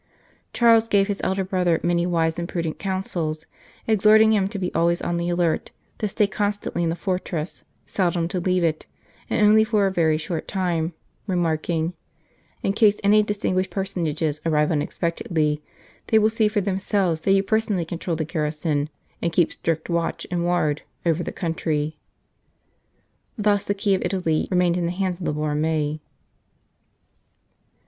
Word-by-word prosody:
Charles 230 Hz, -1 st, +4 dB
gave 200 Hz, -2 st, +3 dB
his 205 Hz, -2 st, -3 dB
elder 190 Hz, 0 st, 0 dB
brother 180 Hz, -3 st, +1 dB
many 175 Hz, 0 st, +1 dB
wise 165 Hz, -1 st, 0 dB
and 170 Hz, -, -4 dB
prudent 165 Hz, -3 st, -3 dB
counsels, 175 Hz, -5 st, -2 dB, 0.4 s
exhorting 220 Hz, +1 st, +5 dB
him 200 Hz, -3 st, +2 dB
to 200 Hz, -, -5 dB
be 180 Hz, -2 st, -3 dB
always 170 Hz, +1 st, +2 dB
on 175 Hz, -, -2 dB
the 170 Hz, 0 st, -1 dB
alert, 175 Hz, -2 st, 0 dB, 0.3 s
to 215 Hz, -, 0 dB
stay 205 Hz, +1 st, +2 dB
constantly 205 Hz, -3 st, -2 dB
in 170 Hz, -, +1 dB
the 165 Hz, -, -1 dB
fortress, 180 Hz, -3 st, -3 dB, 0.2 s
seldom 175 Hz, -3 st, 0 dB
to 180 Hz, -, -2 dB
leave 180 Hz, 0 st, +1 dB
it, 155 Hz, -2 st, -1 dB, 0.4 s
and 210 Hz, -, +3 dB
only 215 Hz, +1 st, +6 dB
for 215 Hz, -2 st, +2 dB
a 195 Hz, -, +1 dB
very 160 Hz, -4 st, +2 dB
short 160 Hz, +1 st, -4 dB
time, 175 Hz, -3 st, -1 dB, 0.3 s
remarking: 165 Hz, -2 st, 0 dB, 0.3 s
" -, -, -37 dB
In 195 Hz, -, +1 dB
case 210 Hz, -1 st, +4 dB
any 210 Hz, +1 st, +5 dB
distinguished 200 Hz, -3 st, -1 dB
personages 160 Hz, -6 st, -2 dB
arrive 150 Hz, -1 st, +2 dB
unexpectedly, 155 Hz, -1 st, -1 dB, 0.5 s
they 220 Hz, -, +4 dB
will 215 Hz, 0 st, +4 dB
see 220 Hz, -1 st, +2 dB
for 210 Hz, -1 st, 0 dB
themselves 190 Hz, -3 st, 0 dB
that 195 Hz, -, +3 dB
you 195 Hz, 0 st, +3 dB
personally 210 Hz, -4 st, 0 dB
control 170 Hz, +1 st, -3 dB
the 160 Hz, 0 st, -2 dB
garrison, 150 Hz, -1 st, -1 dB, 0.3 s
and 170 Hz, -, 0 dB
keep 165 Hz, 0 st, +2 dB
strict 160 Hz, -1 st, -2 dB
watch 170 Hz, -1 st, -1 dB
and 175 Hz, -1 st, 0 dB
ward 165 Hz, -4 st, +1 dB, 0.2 s
over 165 Hz, 0 st, +2 dB
the -, -, -4 dB
country." 155 Hz, -3 st, -2 dB, 1.4 s
Thus 205 Hz, -2 st, +2 dB
the 205 Hz, -, 0 dB
key 200 Hz, 0 st, +1 dB
of 190 Hz, -, +1 dB
Italy 170 Hz, -5 st, 0 dB
remained 180 Hz, -1 st, +2 dB
in 175 Hz, -1 st, 0 dB
the -, -, -1 dB
hands 185 Hz, -1 st, -2 dB
of 175 Hz, -, -5 dB
the -, -, 0 dB
Borromei. 150 Hz, 0 st, -1 dB
175 Hz, 165 wpm, -23 LUFS, 160-195 Hz, 1.4 s, only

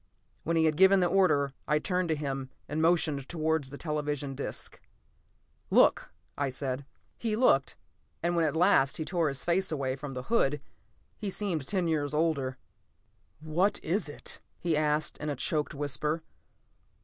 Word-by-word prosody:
When 165 Hz, +1 st, 0 dB
he 160 Hz, -, +4 dB
had 155 Hz, -1 st, +2 dB
given 190 Hz, +1 st, +6 dB
the 180 Hz, -, +3 dB
order, 170 Hz, -7 st, +3 dB
I 150 Hz, -, +3 dB
turned 180 Hz, +2 st, -1 dB
to 160 Hz, -, +2 dB
him 135 Hz, -3 st, -4 dB, 0.2 s
and 150 Hz, +2 st, -2 dB
motioned 160 Hz, -5 st, +2 dB
towards 160 Hz, -4 st, 0 dB
the 140 Hz, -, -8 dB
television 150 Hz, -3 st, -2 dB
disc. 140 Hz, -, -5 dB, 0.9 s
"Look," -, -, +4 dB, 0.3 s
I 140 Hz, -1 st, -1 dB
said. 130 Hz, 0 st, -4 dB, 0.3 s
He 225 Hz, -2 st, -1 dB
looked, 175 Hz, -, +3 dB, 0.5 s
and 175 Hz, +1 st, +1 dB
when 170 Hz, -, +3 dB
at 155 Hz, -1 st, 0 dB
last 160 Hz, -6 st, +4 dB
he 160 Hz, -, -3 dB
tore 170 Hz, 0 st, +1 dB
his 140 Hz, -2 st, -2 dB
face 185 Hz, +2 st, +1 dB
away 135 Hz, -4 st, -1 dB
from 140 Hz, -1 st, -7 dB
the 125 Hz, -, -4 dB
hood, 150 Hz, -, +1 dB, 0.6 s
he 210 Hz, -, -3 dB
seemed 180 Hz, -8 st, -2 dB
ten 185 Hz, -4 st, 0 dB
years 150 Hz, -2 st, 0 dB
older. 140 Hz, -5 st, 0 dB, 0.8 s
"What 175 Hz, +6 st, +1 dB
is 175 Hz, 0 st, 0 dB
it?" 145 Hz, -, -5 dB, 0.2 s
he 170 Hz, -2 st, 0 dB
asked 150 Hz, 0 st, 0 dB
in 150 Hz, -, -3 dB
a 145 Hz, -, -1 dB
choked 150 Hz, +3 st, -1 dB
whisper. 150 Hz, +3 st, -1 dB
155 Hz, 165 wpm, -29 LUFS, 140-170 Hz, 0.9 s, given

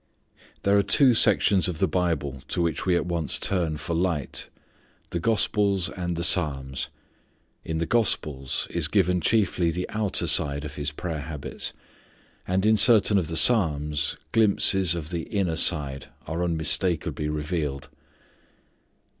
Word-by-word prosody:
There 100 Hz, +1 st, +2 dB
are 100 Hz, -, +4 dB
two 125 Hz, +6 st, +4 dB
sections 105 Hz, -4 st, +3 dB
of 90 Hz, -3 st, -4 dB
the -, -, +1 dB
Bible 75 Hz, -6 st, -2 dB
to -, -, -3 dB
which 85 Hz, +1 st, -2 dB
we 90 Hz, -, +3 dB
at -, -, -1 dB
once 85 Hz, -4 st, 0 dB
turn 85 Hz, -5 st, 0 dB
for 75 Hz, +3 st, -5 dB
light, 85 Hz, -5 st, -2 dB, 0.6 s
the 85 Hz, -, -2 dB
gospels 100 Hz, -2 st, 0 dB
and 90 Hz, -2 st, -4 dB
the 85 Hz, -, -4 dB
Psalms. 70 Hz, -5 st, +2 dB, 0.7 s
In 80 Hz, -, -4 dB
the 85 Hz, -, -1 dB
gospels 75 Hz, -, -1 dB
is 85 Hz, -3 st, 0 dB
given 90 Hz, -1 st, +1 dB
chiefly 95 Hz, -4 st, +1 dB
the 90 Hz, +2 st, -4 dB
outer 105 Hz, -3 st, -2 dB
side 70 Hz, 0 st, +2 dB
of 75 Hz, -, -7 dB
His 75 Hz, 0 st, -4 dB
prayer 80 Hz, 0 st, -5 dB
habits; 75 Hz, -2 st, -4 dB, 0.7 s
and 95 Hz, +2 st, 0 dB
in 110 Hz, 0 st, +4 dB
certain 105 Hz, -1 st, +4 dB
of 85 Hz, -, -4 dB
the 80 Hz, 0 st, -2 dB
Psalms, 75 Hz, -, +2 dB
glimpses 95 Hz, -5 st, +3 dB
of 80 Hz, -1 st, -7 dB
the 85 Hz, -2 st, -4 dB
inner 95 Hz, -6 st, -1 dB
side 75 Hz, -5 st, +1 dB, 0.2 s
are 80 Hz, +3 st, -3 dB
unmistakably 85 Hz, -2 st, -1 dB
revealed. 75 Hz, -2 st, -4 dB
85 Hz, 145 wpm, -24 LUFS, 75-95 Hz, 0.7 s, are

